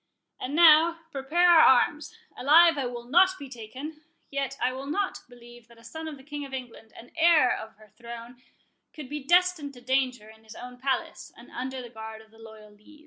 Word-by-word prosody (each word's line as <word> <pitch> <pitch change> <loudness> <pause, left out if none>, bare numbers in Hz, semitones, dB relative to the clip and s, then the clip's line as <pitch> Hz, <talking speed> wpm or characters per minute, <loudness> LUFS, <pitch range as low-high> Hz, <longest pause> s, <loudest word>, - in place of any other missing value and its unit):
—And 270 +3 -5
now, 330 0 +6
prepare 300 +6 +1
our 340 -2 +7 0.2
arms—alive 330 - +2
I 270 -3 -2
will 240 -1 -7
not 365 +9 +3
be 280 - -9
taken;— 260 +6 -9 0.3
yet 275 -1 -3
I 255 - 0
will 265 +2 -7
not 380 +7 -2
believe 240 -1 -16
that 235 -1 -20
a 230 - -19
son 320 +7 -8
of 305 -2 -7
the 265 - -16
King 290 +1 -7
of 270 -1 -7
England, 240 -3 -10
and 235 - -14
heir 320 -6 +4
of 220 -1 -9
her 215 0 -20
throne, 235 +1 -11 0.5
could 295 -5 -10
be 295 -1 -6
destined 345 -3 +1
to 245 - -14
danger 255 -3 -1
in 220 0 -17
his 220 0 -13
own 250 0 -11
palace, 265 0 -3
and - - -16
under 255 +1 -6
the 240 - -10
guard 220 -1 -10
of 220 - -25
the 225 - -21
loyal 220 -1 -14
Lees." 210 +9 -20
265 Hz, 205 wpm, -26 LUFS, 235-305 Hz, 0.5 s, our